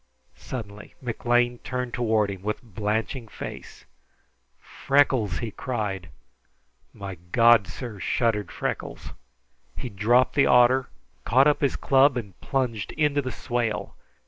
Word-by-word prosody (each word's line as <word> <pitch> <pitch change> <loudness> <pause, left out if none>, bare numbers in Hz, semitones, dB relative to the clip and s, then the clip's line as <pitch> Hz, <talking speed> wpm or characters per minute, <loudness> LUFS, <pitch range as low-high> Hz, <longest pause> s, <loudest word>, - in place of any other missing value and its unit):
Suddenly 105 -5 -8
McLean 120 0 0
turned 125 -1 -4
toward 110 -4 +1
him 95 -2 -8
with 105 +5 -3
blanching 110 +3 -3
face - - -9 0.7
"Freckles!" 130 -9 +1
he 115 -3 -4
cried. 105 -7 -4 0.8
"My 95 -3 -8
God, 115 -4 +6
sir!" 120 -6 -7
shuddered 105 0 0
Freckles. - - -4 0.7
He 125 - -5
dropped 120 +5 +3
the 140 - +4
otter, 125 +1 +5 0.3
caught 130 +4 +4
up 150 -1 +3
his 140 - +1
club, 135 0 +4
and 100 -6 -7
plunged 125 -7 -2
into 150 -2 +1
the 130 -1 -4
swale. 120 -3 -3
120 Hz, 120 wpm, -25 LUFS, 105-130 Hz, 0.8 s, God